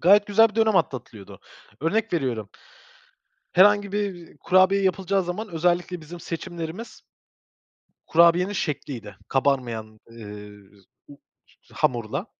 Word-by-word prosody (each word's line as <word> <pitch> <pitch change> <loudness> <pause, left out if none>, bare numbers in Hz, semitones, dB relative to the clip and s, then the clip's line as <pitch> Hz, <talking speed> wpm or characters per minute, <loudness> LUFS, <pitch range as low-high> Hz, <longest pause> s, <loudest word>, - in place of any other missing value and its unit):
Gayet 200 +4 +5
güzel 225 +2 +5
bir 210 - -16
dönem 220 -2 +3
atlatılıyordu. 125 - -3 0.4
Örnek 215 +8 0
veriyorum. 125 - -2 1.0
Herhangi 205 +1 +4
bir, 205 -2 -1
ııı, - - -20
kurabiye 185 +5 +3
yapılacağı 190 +1 +1
zaman 180 +5 -5
özellikle 175 +1 0
bizim 170 +3 -10
seçimlerimiz 170 +6 -7 1.1
kurabiyenin 170 +4 +4
şekliydi 130 - -4
kabarmayan, 120 -6 -1
ııı, 105 -2 -12
z - - -27 0.2
u 145 - -13 0.6
hamurla 120 -4 -1
170 Hz, 110 wpm, -24 LUFS, 120-195 Hz, 1.1 s, Gayet